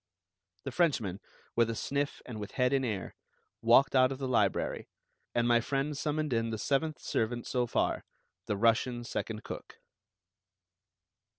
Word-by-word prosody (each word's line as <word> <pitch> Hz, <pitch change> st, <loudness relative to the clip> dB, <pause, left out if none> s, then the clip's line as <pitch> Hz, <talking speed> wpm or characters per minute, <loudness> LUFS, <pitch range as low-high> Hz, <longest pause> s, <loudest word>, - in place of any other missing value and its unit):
The -, -, -4 dB
Frenchman, 120 Hz, -, +1 dB, 0.4 s
with 115 Hz, -1 st, +3 dB
a 115 Hz, -, -2 dB
sniff 140 Hz, +5 st, -2 dB
and 115 Hz, -4 st, -6 dB
with 105 Hz, -, -6 dB
head 125 Hz, 0 st, +2 dB
in 135 Hz, -1 st, +2 dB
air, 105 Hz, -7 st, -3 dB, 0.5 s
walked 120 Hz, +4 st, +5 dB
out 130 Hz, 0 st, +5 dB
of 135 Hz, -, -3 dB
the 135 Hz, -1 st, -3 dB
library; 105 Hz, -6 st, +1 dB, 0.5 s
and 120 Hz, 0 st, +3 dB
my 120 Hz, -1 st, +5 dB
friend 140 Hz, +4 st, -1 dB
summoned 150 Hz, -1 st, -1 dB
in 115 Hz, 0 st, +1 dB
the 110 Hz, -, -2 dB
seventh 145 Hz, +7 st, 0 dB
servant 120 Hz, +1 st, -1 dB
so 125 Hz, -1 st, 0 dB
far, -, -, 0 dB, 0.4 s
the 105 Hz, -, 0 dB
Russian 120 Hz, +2 st, +2 dB
second 110 Hz, -2 st, -4 dB
cook. -, -, -8 dB
120 Hz, 155 wpm, -31 LUFS, 115-135 Hz, 0.5 s, walked